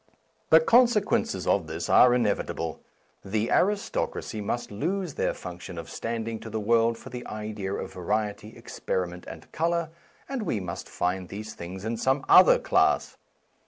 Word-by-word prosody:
The 160 - +8
consequences 230 +3 +3
of 90 -6 +1
this 80 +1 -4
are 125 -1 +6
inevitable. 100 -8 -1 0.4
The 110 +3 -1
aristocracy 200 - 0
must 110 +3 -3
lose 175 - -2
their - - -1
function 90 0 -8
of 85 - -7
standing 115 -1 -4
to 110 - -9
the 110 - -3
world 115 +2 +2
for - - -12
the 125 0 -6
idea 105 -2 -4
of - - -6
variety, 105 +3 -3
experiment, 90 -1 -4
and 80 -1 -10
colour, 170 0 -1 0.4
and 270 -3 -3
we 160 - -1
must 90 -3 -6
find 90 0 -2
these 110 +2 -7
things 95 +4 -8
in 115 +1 -2
some 130 +4 0
other - - +8
class. - - +2
110 Hz, 155 wpm, -27 LUFS, 95-135 Hz, 0.4 s, The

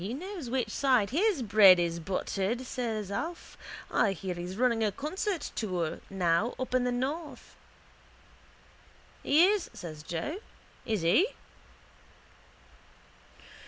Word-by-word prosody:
—He 210 +7 -4
knows 355 -4 -6
which 245 -3 -1
side 250 -7 +2
his 355 - +2
bread 200 -4 +7
is 170 -1 -1
buttered, 195 +6 -2
says 225 -6 -3
Alf. 330 +12 -5 0.4
I 200 - +2
hear 185 0 -4
he's 175 +2 -6
running 235 -2 +2
a 210 - +2
concert 325 - -3
tour 180 -7 -2
now 185 +3 +1
up 255 -1 -4
in 255 -1 +2
the 250 - +1
north. 285 +6 -4 1.7
—He 310 +5 +5
is, 405 -2 +1
says 155 -3 -8
Joe. 170 - -4 0.5
Isn't 205 -7 0
he? 345 - +5
230 Hz, 125 wpm, -29 LUFS, 190-285 Hz, 1.7 s, bread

